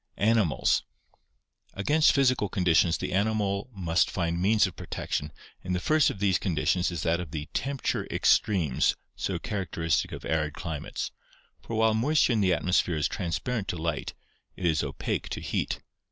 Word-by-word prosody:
Animals. 110 -8 +2 0.5
— - - -50 0.2
Against 150 +11 +4
physical 130 -7 +2
conditions 90 -2 +3
the - - -4
animal 100 +1 0
must 90 -5 +1
find 85 -1 -1
means 105 +3 +4
of 95 - -5
protection 75 +1 -4 0.3
and 90 0 -2
the - - 0
first 155 +8 +3
of - - -5
these 95 -2 +2
conditions 90 0 +1
is 85 -4 -4
that 85 0 +1
of 90 -3 -5
the 75 0 -5
temperature 135 0 -2
extremes 85 -11 +2 0.2
so - - -2
characteristic 85 -5 -1
of - - -7
arid 75 0 -1
climates, 80 -5 -4 0.5
for 115 - -6
while 110 0 +3
moisture 130 +4 +3
in 110 - +2
the 95 -2 +3
atmosphere 90 0 +1
is 75 - +1
transparent 100 +5 -3
to 90 - -3
light, 80 -2 -3 0.4
it 90 - -5
is 80 -2 +2
opaque - - -3
to - - -4
heat. - - -2
90 Hz, 165 wpm, -27 LUFS, 85-110 Hz, 0.5 s, Against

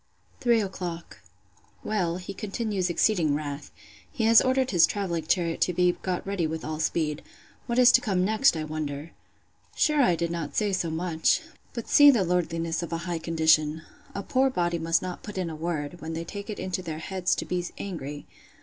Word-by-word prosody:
Three 235 -2 +3
o'clock. 180 -4 -6 0.6
Well, 180 -5 -1
he 185 +2 -7
continues 200 -2 -2
exceeding 175 -5 +2
wrath. 145 -1 -5 0.4
He 255 -7 -3
has 225 0 +7
ordered 260 0 +1
his 170 -4 +5
travelling 170 -6 -3
chariot 170 -2 0
to 180 - +2
be 180 +1 +3
got 185 -2 -2
ready 195 -4 -1
with 160 +1 -5
all 155 0 -4
speed. 155 -1 -1 0.5
What 240 -1 -1
is 250 -1 +7
to 255 - +5
come 185 -5 +1
next, 220 -1 +3
I 155 - -2
wonder! 150 0 -5 0.6
Sure 300 -2 +3
I 180 -9 +4
did 170 0 -2
not 165 -4 -4
say 210 -2 +1
so 175 -3 0
much!—But 170 +7 -2
see 290 0 +8
the 240 -8 +4
lordliness 165 -2 -1
of 170 - -6
a 165 - -1
high 175 -2 -2
condition!—A 160 +3 0
poor 265 +3 +2
body 175 -7 -1
must 165 +1 +1
not 180 -1 -5
put 210 -3 -8
in 180 -3 -2
a - - -6
word, 160 0 -4
when 160 +1 -5
they 165 +1 -3
take 200 +5 -8
it 215 - -4
into 185 0 -3
their 160 -3 -5
heads 185 +2 -1
to - - -4
be 180 -1 -2
angry! 150 -7 -6
175 Hz, 190 wpm, -26 LUFS, 160-200 Hz, 0.6 s, see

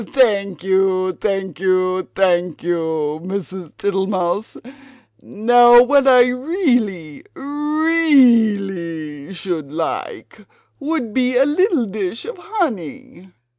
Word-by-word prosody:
"Thank 200 - 0
you, 190 -1 +1
thank 195 -3 -4
you, 185 0 0
thank 180 -4 0
you, 160 -3 -2
Mrs. 185 -2 -6
Tittlemouse! 195 0 -2 0.6
Now 240 +2 +5
what 275 +1 +2
I 250 -2 +6
really 245 - -2
REALLY 235 - +1
should 165 -6 -5
like 160 +1 -6 0.3
would 280 -7 -3
be 250 -1 +1
a 270 - +4
little 310 - +1
dish 200 +1 -5
of 465 -4 -8
honey!" 265 - -5
200 Hz, 95 wpm, -18 LUFS, 180-260 Hz, 0.6 s, I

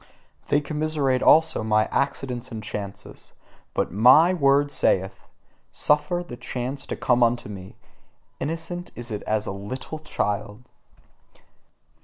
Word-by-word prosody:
They 145 - +2
commiserate 150 -3 0
also 160 -4 +5
my 110 0 +3
accidents 130 -3 -2
and 110 -1 -6
chances: 100 -2 -8 0.4
but - - 0
MY 130 - +6
word 145 -3 +3
saith: 95 -8 0 0.4
"Suffer 150 +4 +1
the 120 - -8
chance 130 +4 -5
to - - -3
come 125 -1 +1
unto 120 -1 +2
me: 95 -2 -9 0.6
innocent 165 +4 -4
is 120 0 -6
it 105 - -3
as 110 0 0
a - - -3
little 115 +10 -6
child!" 105 -6 -3
130 Hz, 125 wpm, -24 LUFS, 110-150 Hz, 0.6 s, MY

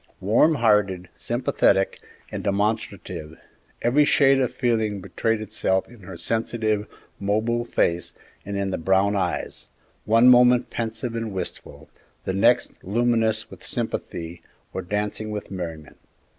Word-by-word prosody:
Warm 115 - +4
hearted, 105 -7 +2
sympathetic, 110 -5 +1 0.3
and - - -5
demonstrative, 100 -6 -2 0.5
every 130 +6 +4
shade 135 -2 +4
of 125 -2 0
feeling 110 -4 0
betrayed 100 +4 -1
itself 95 -2 -1
in 120 -1 -16
her 95 -2 -10
sensitive, 110 +2 -1 0.3
mobile 110 +4 0
face 85 -6 0 0.3
and 100 0 -4
in 100 -1 -1
the - - -2
brown 95 +4 +2
eyes, 100 - -2 0.4
one 115 +3 +5
moment 125 0 +6
pensive 115 +1 -3
and 115 -1 -3
wistful, 95 -2 -6 0.4
the 95 - -1
next 120 +6 +2
luminous 110 +1 +1
with - - -12
sympathy 85 0 -4 0.3
or 95 - -3
dancing 105 +3 -3
with 105 -1 -6
merriment. 85 -5 -7
105 Hz, 130 wpm, -24 LUFS, 95-115 Hz, 0.5 s, moment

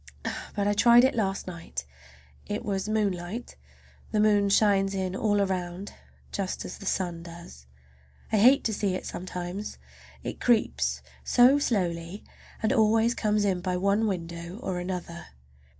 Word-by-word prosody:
But 200 -1 0
I 205 - +3
tried 235 +3 +6
it 260 - +4
last 195 -3 -1
night. 165 - -6 0.6
It 205 +1 -3
was 195 0 -2
moonlight. 205 +1 -2 0.6
The 215 - +1
moon 205 -1 +4
shines 195 -1 +3
in 190 -1 -2
all 205 0 +1
around, 185 0 -2 0.4
just 195 -2 -3
as - - -7
the 200 - -7
sun 175 -3 -1
does. 170 - -12 0.6
I 220 - +3
hate 255 +7 +6
to 220 - 0
see 200 -2 0
it - - -5
sometimes, 180 +2 -5 0.5
it - - -5
creeps 235 -3 +1 0.2
so 255 +3 +5
slowly, 180 -6 -1 0.4
and 220 +4 +2
always 225 0 +3
comes 210 -2 +1
in 185 -3 0
by 180 0 -1
one 200 +4 +2
window 170 -1 -5
or 185 -6 -3
another. 175 -1 -5
195 Hz, 150 wpm, -27 LUFS, 180-215 Hz, 0.6 s, tried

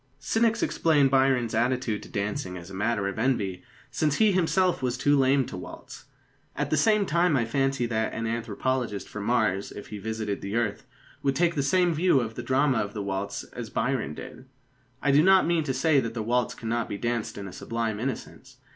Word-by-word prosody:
Cynics 225 +9 +1
explain 150 -4 +3
Byron's 130 -3 +2
attitude 120 -1 0
to - - -12
dancing 100 -2 -3
as 85 +1 -10
a - - -9
matter 105 0 0
of 100 +2 -4
envy, 100 -7 0 0.3
since 150 -2 +1
he 215 -2 +4
himself 185 0 +2
was 125 -1 -1
too 145 +2 +3
lame 135 0 +3
to - - -8
waltz. - - -10 0.5
At - - -2
the - - +4
same 210 +6 +3
time, 170 -2 +2
I 120 - +1
fancy 135 +1 0
that 110 -1 -1
an 115 - -4
anthropologist 115 0 -2
from 105 -1 -6
Mars, 110 -5 +1
if 100 - -9
he 105 - -6
visited 110 -1 -3
the 100 +2 -4
earth, 110 -4 -1 0.3
would 135 -1 +1
take 170 +3 +2
the 145 - 0
same 175 +5 +2
view 160 -2 +3
of 115 -2 -3
the 120 - -5
drama 130 +1 +2
of 105 0 -3
the 105 - -3
waltz 100 +1 -3
as 120 -3 -6
Byron 115 - -1
did. - - -10 0.6
I 145 - +3
do 145 +2 +6
not 190 +2 +5
mean 170 -1 +1
to 135 - -1
say 145 +2 +3
that 115 -2 -3
the 110 - -2
waltz 125 +2 0
cannot 115 0 -2
be 100 - -3
danced 120 0 -2
in 100 -1 -6
a 90 - -9
sublime 115 0 -3
innocence. 130 +1 -6
125 Hz, 210 wpm, -27 LUFS, 110-140 Hz, 0.6 s, do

